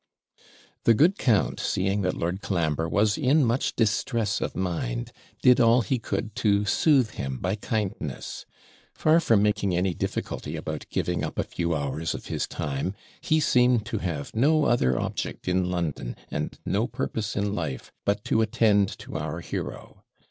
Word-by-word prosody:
The 115 Hz, -, +6 dB
good 175 Hz, -, +4 dB
count, 110 Hz, -6 st, +2 dB
seeing 95 Hz, +2 st, 0 dB
that 90 Hz, -1 st, 0 dB
Lord 90 Hz, +4 st, -2 dB
Colambre 80 Hz, -3 st, 0 dB
was 105 Hz, +2 st, +2 dB
in 145 Hz, +1 st, +4 dB
much 120 Hz, +3 st, 0 dB
distress 110 Hz, -1 st, 0 dB
of -, -, -3 dB
mind, 80 Hz, -10 st, -2 dB, 0.3 s
did 125 Hz, -1 st, +6 dB
all 120 Hz, +1 st, +5 dB
he 130 Hz, +2 st, 0 dB
could 110 Hz, -1 st, -3 dB
to 105 Hz, -4 st, +2 dB
soothe 130 Hz, +1 st, +3 dB
him 65 Hz, -8 st, -4 dB
by 90 Hz, +8 st, -1 dB
kindness; 100 Hz, -, -4 dB, 0.5 s
far 155 Hz, +2 st, +4 dB
from 115 Hz, -10 st, +3 dB
making 100 Hz, -3 st, +1 dB
any 90 Hz, +1 st, +1 dB
difficulty -, -, -4 dB
about -, -, -5 dB
giving -, -, -1 dB
up -, -, -4 dB
a -, -, +1 dB
few 85 Hz, -1 st, -2 dB
hours 75 Hz, +2 st, -2 dB
of -, -, -8 dB
his -, -, -1 dB
time, 75 Hz, +7 st, -3 dB, 0.3 s
he 155 Hz, 0 st, +2 dB
seemed 125 Hz, -5 st, +3 dB
to 110 Hz, -1 st, -3 dB
have 85 Hz, -4 st, -4 dB
no 150 Hz, +6 st, +4 dB
other 65 Hz, -, +2 dB
object -, -, -4 dB
in 90 Hz, 0 st, +1 dB
London, 85 Hz, -9 st, -2 dB, 0.2 s
and 75 Hz, +1 st, -3 dB
no -, -, +1 dB
purpose 110 Hz, -2 st, -3 dB
in 100 Hz, -1 st, 0 dB
life, 80 Hz, -10 st, -4 dB
but 100 Hz, +2 st, 0 dB
to 115 Hz, -2 st, +2 dB
attend 105 Hz, -3 st, +3 dB
to -, -, -7 dB
our 80 Hz, +2 st, -4 dB
hero. -, -, -6 dB
100 Hz, 165 wpm, -26 LUFS, 85-115 Hz, 0.5 s, The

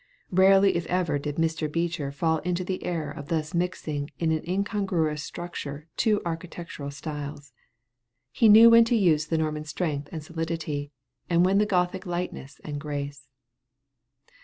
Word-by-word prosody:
Rarely 195 Hz, +1 st, +5 dB
if 170 Hz, -1 st, -2 dB
ever 175 Hz, -5 st, 0 dB
did 145 Hz, 0 st, -4 dB
Mr. 160 Hz, -1 st, -1 dB
Beecher 165 Hz, -3 st, -1 dB
fall 160 Hz, +2 st, 0 dB
into 180 Hz, +2 st, -2 dB
the 185 Hz, +1 st, -4 dB
error 160 Hz, -4 st, -2 dB
of 145 Hz, -1 st, -8 dB
thus 160 Hz, +1 st, -2 dB
mixing 160 Hz, -5 st, -2 dB
in 165 Hz, -1 st, 0 dB
an 160 Hz, -1 st, 0 dB
incongruous 185 Hz, -6 st, 0 dB
structure 150 Hz, -4 st, -6 dB
two 215 Hz, -3 st, +2 dB
architectural 165 Hz, -3 st, -5 dB
styles. 145 Hz, -2 st, -7 dB, 0.8 s
He 220 Hz, -, +4 dB
knew 225 Hz, +2 st, +9 dB
when 230 Hz, 0 st, +8 dB
to 235 Hz, -, +2 dB
use 160 Hz, -8 st, +3 dB
the 160 Hz, -, 0 dB
Norman 155 Hz, -1 st, -2 dB
strength 150 Hz, -2 st, -3 dB
and 160 Hz, -2 st, -6 dB
solidity, 160 Hz, -3 st, -4 dB, 0.4 s
and 175 Hz, 0 st, +4 dB
when 195 Hz, +2 st, +3 dB
the 210 Hz, -, +2 dB
Gothic 185 Hz, -1 st, 0 dB
lightness 175 Hz, -6 st, -5 dB
and 145 Hz, -1 st, -5 dB
grace. 145 Hz, -2 st, -5 dB
165 Hz, 155 wpm, -26 LUFS, 150-180 Hz, 0.8 s, knew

